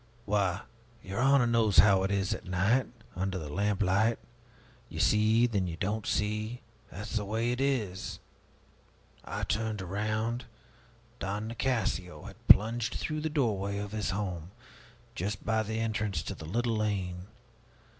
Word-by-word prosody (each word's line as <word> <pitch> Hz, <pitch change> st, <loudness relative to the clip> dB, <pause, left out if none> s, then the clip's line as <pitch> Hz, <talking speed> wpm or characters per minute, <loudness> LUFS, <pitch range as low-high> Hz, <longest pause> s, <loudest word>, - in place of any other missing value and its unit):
Why, 100 Hz, -1 st, +1 dB, 0.4 s
your 95 Hz, +2 st, -4 dB
honor 135 Hz, 0 st, +5 dB
knows 115 Hz, -4 st, +2 dB
how 100 Hz, -2 st, +7 dB
it 95 Hz, -, 0 dB
is 100 Hz, 0 st, +1 dB
at -, -, -6 dB
night, 95 Hz, +8 st, +2 dB, 0.3 s
under 95 Hz, +1 st, -1 dB
the 80 Hz, -4 st, -5 dB
lamplight. 105 Hz, +3 st, +2 dB, 0.7 s
You -, -, -6 dB
see 110 Hz, +2 st, +4 dB
and 120 Hz, -, -3 dB
then 95 Hz, -3 st, +1 dB
you 85 Hz, -1 st, -5 dB
don't 105 Hz, +4 st, -2 dB
see 110 Hz, +4 st, -1 dB, 0.3 s
that's 105 Hz, +5 st, -7 dB
the 105 Hz, -, -1 dB
way 110 Hz, +4 st, 0 dB
it 125 Hz, +2 st, -2 dB
is. 115 Hz, -10 st, -1 dB, 1.0 s
I -, -, -4 dB
turned 110 Hz, -1 st, -1 dB
around 110 Hz, +5 st, -2 dB, 0.7 s
Don 100 Hz, +2 st, -3 dB
Nicasio 115 Hz, -7 st, -1 dB
had -, -, -12 dB
plunged 115 Hz, +2 st, +5 dB
through 155 Hz, 0 st, -2 dB
the 160 Hz, -, -1 dB
doorway 105 Hz, -9 st, 0 dB
of 100 Hz, 0 st, -4 dB
his 110 Hz, -1 st, -2 dB
home 90 Hz, -4 st, -3 dB, 0.6 s
just 100 Hz, -2 st, -4 dB
by 110 Hz, -1 st, +2 dB
the 110 Hz, +1 st, -3 dB
entrance 105 Hz, -7 st, -1 dB
to -, -, -4 dB
the 80 Hz, -, -9 dB
little 115 Hz, +7 st, 0 dB
lane. 95 Hz, -4 st, -2 dB
105 Hz, 150 wpm, -30 LUFS, 95-115 Hz, 1.0 s, how